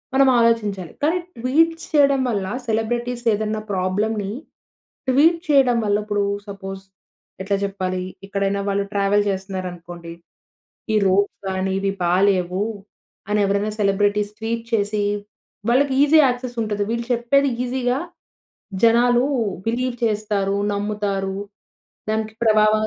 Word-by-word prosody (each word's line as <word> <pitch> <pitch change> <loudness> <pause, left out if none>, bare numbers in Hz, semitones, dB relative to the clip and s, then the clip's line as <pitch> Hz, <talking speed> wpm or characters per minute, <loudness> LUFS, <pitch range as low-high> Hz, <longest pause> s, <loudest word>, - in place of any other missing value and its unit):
మనం 270 0 +5
ఆలోచించాలి. 210 -6 +1
కానీ 320 +4 +3 0.2
ట్వీట్స్ 325 +8 +1
చేయడం 280 -2 +5
వల్ల 200 -4 -1 0.2
సెలబ్రిటీస్ 240 +2 -1
ఏదైనా 215 +1 -2
ప్రాబ్లమ్‌ని 200 +2 -1 0.8
ట్వీట్ 320 +6 +4
చేయడం 265 -4 +4
వల్ల 205 0 +2
ఇప్పుడు 205 -1 0 0.2
సపోజ్ 195 -1 -7 0.6
ఎట్లా 200 0 0
చెప్పాలి, 185 -2 -3 0.2
ఎక్కడైనా 200 0 -1
వాళ్ళు 200 0 +1
ట్రావెల్ 200 +1 +2
చేస్తున్నారు 190 -1 -3
అనుకోండి. 170 -1 -10 0.8
ఈ - - +3
రోడ్స్ 200 +2 +2
కానీ 190 0 -1
ఇవి 195 0 0
బాలేవు 185 +1 +2 0.7
అని 210 0 +2
ఎవరైనా 200 +2 0
సెలబ్రిటీస్ 205 +1 +1
ట్వీట్ 230 +1 -2
చేసి, 210 -1 +1 0.7
వాళ్ళకి 265 +2 +3
ఈజీ 300 +2 +5
యాక్సెస్ 245 -1 -2
ఉంటది. 210 -1 -1
వీళ్ళు 235 0 -2
చెప్పేది 270 +4 +2 0.2
ఈజీగా 250 +1 0 0.8
జనాలు 240 +2 +5 0.4
బిలీవ్ 245 +2 -1
చేస్తారు, 205 -2 0 0.2
నమ్ముతారు. 200 -2 -2 0.7
దానికి 220 0 -1
ప్రభావ 215 -1 +4
210 Hz, 115 wpm, -21 LUFS, 195-240 Hz, 0.8 s, మనం